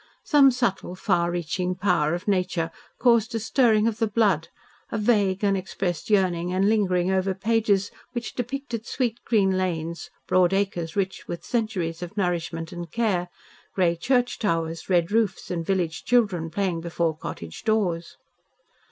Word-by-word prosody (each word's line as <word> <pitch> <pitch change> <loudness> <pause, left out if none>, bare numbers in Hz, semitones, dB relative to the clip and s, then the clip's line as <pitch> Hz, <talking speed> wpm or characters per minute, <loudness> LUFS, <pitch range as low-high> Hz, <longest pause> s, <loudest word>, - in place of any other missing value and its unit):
Some 285 -3 +6
subtle, 235 -8 -1
far 175 -3 +1
reaching 175 +1 -2
power 175 -5 +1
of 175 - -7
nature 180 -4 0 0.3
caused 235 -2 +3
a - - 0
stirring 220 -1 +3
of 225 -1 -2
the 225 - +2
blood, 205 -7 +2 0.4
a - - -1
vague, 205 -3 +2
unexpressed 190 -3 -1
yearning 180 -4 +2
and 190 +2 +2
lingering 190 -4 +2
over 190 0 +1
pages 205 -1 +1 0.2
which 240 -1 -4
depicted 245 -2 -4
sweet, 240 -3 -1
green 195 -5 +3
lanes, 170 -2 -3 0.2
broad 185 0 +3
acres 185 -5 -1
rich 190 -1 -2
with 170 - -5
centuries 200 -9 -2
of 175 +4 -7
nourishment 170 -3 -2
and 175 -1 -7
care; 195 -7 0 0.5
grey 175 -3 +3
church 245 +7 +1
towers, 165 -5 -1
red 175 0 +2
roofs, 215 -5 0
and 170 -2 -3
village 175 -4 -1
children 200 -9 +2
playing 180 -1 -1
before 170 -1 -1
cottage 85 - -7
doors. 185 -7 0
190 Hz, 150 wpm, -25 LUFS, 170-220 Hz, 0.5 s, Some